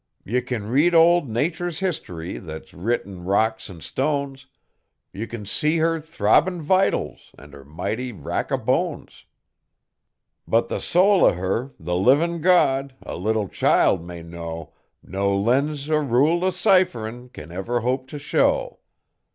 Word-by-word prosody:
Ye 125 Hz, +5 st, 0 dB
can 120 Hz, -4 st, -4 dB
read 150 Hz, +9 st, +3 dB
old 165 Hz, -3 st, +5 dB
Nature's 160 Hz, +8 st, -2 dB
history 150 Hz, -, -4 dB
thet's 80 Hz, -3 st, -9 dB
writ 115 Hz, +8 st, -1 dB
in 95 Hz, -3 st, -10 dB
rocks 110 Hz, +4 st, 0 dB
an' 85 Hz, -4 st, -11 dB
stones, 140 Hz, -, -2 dB, 0.7 s
Ye 110 Hz, +4 st, -5 dB
can 110 Hz, -3 st, -7 dB
see 150 Hz, +10 st, +1 dB
her 165 Hz, 0 st, +1 dB
throbbin' 170 Hz, +3 st, +2 dB
vitals 185 Hz, +5 st, 0 dB
an' 70 Hz, +1 st, -14 dB
her 70 Hz, -1 st, -12 dB
mighty 100 Hz, -, -4 dB
rack 95 Hz, -10 st, -4 dB
o' -, -, +2 dB
hones. -, -, -2 dB, 1.2 s
But 115 Hz, +1 st, +2 dB
the -, -, -2 dB
soul 190 Hz, +2 st, +3 dB
o' -, -, +6 dB
her 95 Hz, +9 st, -3 dB
the 90 Hz, +2 st, -3 dB
livin' 150 Hz, -, +3 dB
God, 140 Hz, -6 st, +3 dB
a -, -, -6 dB
little 105 Hz, +3 st, -1 dB
child 90 Hz, -1 st, +2 dB
may 85 Hz, -1 st, -9 dB
know 85 Hz, -2 st, -8 dB, 0.3 s
No 100 Hz, +2 st, -1 dB
lens 140 Hz, +7 st, 0 dB
er 155 Hz, -1 st, +2 dB
rule 145 Hz, +6 st, +2 dB
o' 185 Hz, -, +3 dB
cipherin' 125 Hz, -, +1 dB
can 80 Hz, -8 st, -11 dB
ever 115 Hz, +7 st, -2 dB
hope 130 Hz, +2 st, -1 dB
t' 150 Hz, -, -7 dB
show. -, -, 0 dB
125 Hz, 150 wpm, -23 LUFS, 95-160 Hz, 1.2 s, o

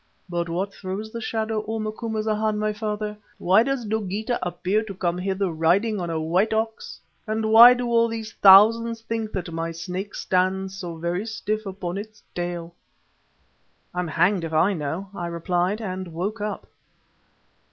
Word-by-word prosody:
But 170 Hz, -1 st, -2 dB
what 190 Hz, +4 st, -2 dB
throws 200 Hz, +3 st, -6 dB
the 230 Hz, -, -5 dB
shadow, 220 Hz, -1 st, -2 dB
O 225 Hz, 0 st, -2 dB
Macumazana, 215 Hz, -1 st, -1 dB
my 215 Hz, 0 st, 0 dB
father? 210 Hz, 0 st, -3 dB, 0.2 s
Why 190 Hz, +5 st, +4 dB
does 265 Hz, -1 st, -1 dB
Dogeetah 215 Hz, +2 st, -2 dB
appear 180 Hz, +4 st, 0 dB
to 210 Hz, -3 st, -7 dB
come 175 Hz, -1 st, -1 dB
hither 190 Hz, 0 st, -1 dB
riding 185 Hz, +7 st, +2 dB
on 175 Hz, -1 st, -3 dB
a 165 Hz, -1 st, -1 dB
white 180 Hz, +8 st, +1 dB
ox 220 Hz, 0 st, -3 dB, 0.3 s
and 220 Hz, 0 st, -1 dB
why 235 Hz, +3 st, +10 dB
do 245 Hz, 0 st, -3 dB
all 230 Hz, -1 st, +3 dB
these 225 Hz, -1 st, -5 dB
thousands 225 Hz, +4 st, +6 dB
think 225 Hz, -1 st, -3 dB
that 180 Hz, -3 st, -4 dB
my 165 Hz, 0 st, -2 dB
Snake 180 Hz, +4 st, -5 dB
stands 190 Hz, +1 st, 0 dB
so 175 Hz, -3 st, -6 dB
very 175 Hz, +6 st, -2 dB
stiff 215 Hz, -1 st, -3 dB
upon 190 Hz, -1 st, -4 dB
its 215 Hz, 0 st, -10 dB
tail?" 175 Hz, -1 st, -4 dB, 1.2 s
"I'm 180 Hz, 0 st, -2 dB
hanged 175 Hz, +4 st, +2 dB
if 165 Hz, -1 st, -4 dB
I 180 Hz, +6 st, +3 dB
know," 170 Hz, +4 st, -4 dB
I 175 Hz, -3 st, -4 dB
replied 175 Hz, +4 st, -1 dB
and 185 Hz, -3 st, -4 dB
woke 200 Hz, +7 st, -3 dB
up. 210 Hz, 0 st, -4 dB
200 Hz, 165 wpm, -24 LUFS, 175-220 Hz, 1.2 s, why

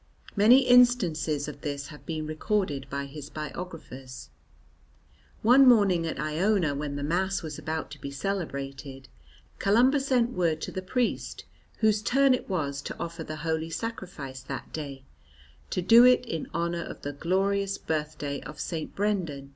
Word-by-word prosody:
Many 225 Hz, +6 st, +7 dB
instances 180 Hz, -, +4 dB
of 145 Hz, -2 st, -8 dB
this 145 Hz, -1 st, -4 dB
have 150 Hz, -2 st, -13 dB
been 155 Hz, -2 st, -3 dB
recorded 155 Hz, -3 st, -1 dB
by 140 Hz, 0 st, -3 dB
his 145 Hz, +1 st, -9 dB
biographers. 150 Hz, -6 st, -8 dB, 1.1 s
One 255 Hz, +4 st, +7 dB
morning 195 Hz, -8 st, +4 dB
at -, -, -4 dB
Iona 165 Hz, +1 st, +1 dB
when 140 Hz, 0 st, -4 dB
the 145 Hz, -, -3 dB
Mass 185 Hz, +5 st, 0 dB
was 155 Hz, -, -6 dB
about 160 Hz, 0 st, -4 dB
to -, -, -10 dB
be 140 Hz, -, -5 dB
celebrated, 140 Hz, -5 st, -5 dB, 0.5 s
Columba 245 Hz, +8 st, +4 dB
sent 255 Hz, -3 st, +1 dB
word 170 Hz, -7 st, 0 dB
to -, -, -4 dB
the 185 Hz, -, -4 dB
priest 240 Hz, +6 st, -2 dB, 0.4 s
whose 215 Hz, -1 st, +3 dB
turn 270 Hz, +5 st, +4 dB
it 255 Hz, -, -3 dB
was 140 Hz, -7 st, -2 dB
to -, -, -6 dB
offer 170 Hz, -1 st, -5 dB
the 155 Hz, -, -6 dB
Holy 160 Hz, 0 st, -1 dB
Sacrifice 165 Hz, -, -6 dB
that -, -, -7 dB
day, 140 Hz, -4 st, -6 dB, 0.7 s
to 180 Hz, -, -2 dB
do 230 Hz, +5 st, +8 dB
it 250 Hz, 0 st, +5 dB
in 165 Hz, -9 st, -4 dB
honour 170 Hz, 0 st, -1 dB
of -, -, -8 dB
the 145 Hz, -, -4 dB
glorious 195 Hz, +5 st, 0 dB
birthday 150 Hz, -2 st, -3 dB
of 150 Hz, +2 st, -10 dB
St. 160 Hz, -3 st, -4 dB
Brendan. 175 Hz, -10 st, -1 dB
165 Hz, 155 wpm, -27 LUFS, 145-205 Hz, 1.1 s, do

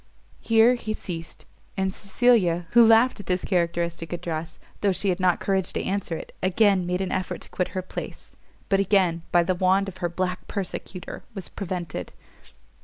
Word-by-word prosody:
Here 225 Hz, +2 st, +5 dB
he 220 Hz, -3 st, -3 dB
ceased: 165 Hz, -5 st, -7 dB, 0.3 s
and 190 Hz, 0 st, 0 dB
Cecilia, 195 Hz, -6 st, +2 dB
who 235 Hz, 0 st, +7 dB
laughed 225 Hz, +2 st, +5 dB
at 200 Hz, -, -9 dB
this 180 Hz, 0 st, 0 dB
characteristic 170 Hz, -2 st, -1 dB
address, 165 Hz, -2 st, -4 dB, 0.2 s
though 200 Hz, -, +2 dB
she 195 Hz, +2 st, 0 dB
had 180 Hz, -, 0 dB
not 180 Hz, -2 st, +3 dB
courage 190 Hz, -2 st, 0 dB
to -, -, -2 dB
answer 195 Hz, -3 st, -2 dB
it, -, -, -10 dB
again 190 Hz, -1 st, +3 dB
made 180 Hz, +1 st, -1 dB
an 190 Hz, -, -2 dB
effort 185 Hz, 0 st, -2 dB
to -, -, -9 dB
quit 180 Hz, -, -1 dB
her 185 Hz, -, -1 dB
place, -, -, -8 dB, 0.3 s
but 195 Hz, -, +2 dB
again 190 Hz, -4 st, +2 dB
by 175 Hz, -1 st, +5 dB
the 185 Hz, +2 st, +1 dB
wand 190 Hz, +2 st, +2 dB
of 190 Hz, -1 st, -7 dB
her 175 Hz, -2 st, -1 dB
black 180 Hz, +1 st, -3 dB
persecutor 185 Hz, -1 st, -5 dB
was 195 Hz, -, -6 dB
prevented. 175 Hz, -, -5 dB
185 Hz, 180 wpm, -25 LUFS, 175-200 Hz, 0.3 s, who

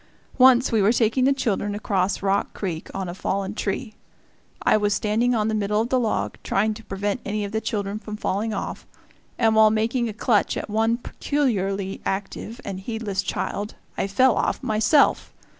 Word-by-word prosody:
Once 255 Hz, 0 st, +6 dB
we 225 Hz, -2 st, +3 dB
were 200 Hz, +3 st, +4 dB
taking 240 Hz, +2 st, +2 dB
the 275 Hz, -, +4 dB
children 205 Hz, -6 st, -1 dB
across 195 Hz, -2 st, -1 dB
Rock 200 Hz, 0 st, 0 dB
Creek 170 Hz, -5 st, -4 dB
on 190 Hz, -1 st, -4 dB
a 175 Hz, -, -5 dB
fallen 195 Hz, +1 st, -2 dB
tree. 215 Hz, +3 st, -3 dB, 0.7 s
I -, -, +4 dB
was 205 Hz, -1 st, +2 dB
standing 230 Hz, +4 st, +1 dB
on 215 Hz, -1 st, +1 dB
the 220 Hz, -, 0 dB
middle 210 Hz, 0 st, 0 dB
of 230 Hz, +2 st, 0 dB
the 260 Hz, -, +2 dB
log 105 Hz, -, -1 dB
trying 215 Hz, +2 st, +1 dB
to 225 Hz, +1 st, -11 dB
prevent 200 Hz, +3 st, -3 dB
any 210 Hz, 0 st, -2 dB
of 200 Hz, -, -6 dB
the 220 Hz, 0 st, -1 dB
children 205 Hz, -1 st, -3 dB
from 215 Hz, -1 st, -7 dB
falling 210 Hz, +2 st, -1 dB
off, 205 Hz, -, -5 dB, 0.5 s
and 225 Hz, -2 st, +3 dB
while 220 Hz, 0 st, +6 dB
making 230 Hz, +2 st, 0 dB
a -, -, -5 dB
clutch 215 Hz, -1 st, +1 dB
at -, -, -5 dB
one 225 Hz, +2 st, +2 dB
peculiarly 200 Hz, -9 st, -2 dB
active 205 Hz, +4 st, -4 dB
and 195 Hz, -2 st, -4 dB
heedless 205 Hz, -2 st, -3 dB
child 205 Hz, +2 st, -3 dB, 0.2 s
I -, -, -1 dB
fell 250 Hz, +6 st, +4 dB
off -, -, -1 dB
myself. 230 Hz, +5 st, +2 dB
215 Hz, 185 wpm, -24 LUFS, 200-230 Hz, 0.7 s, Once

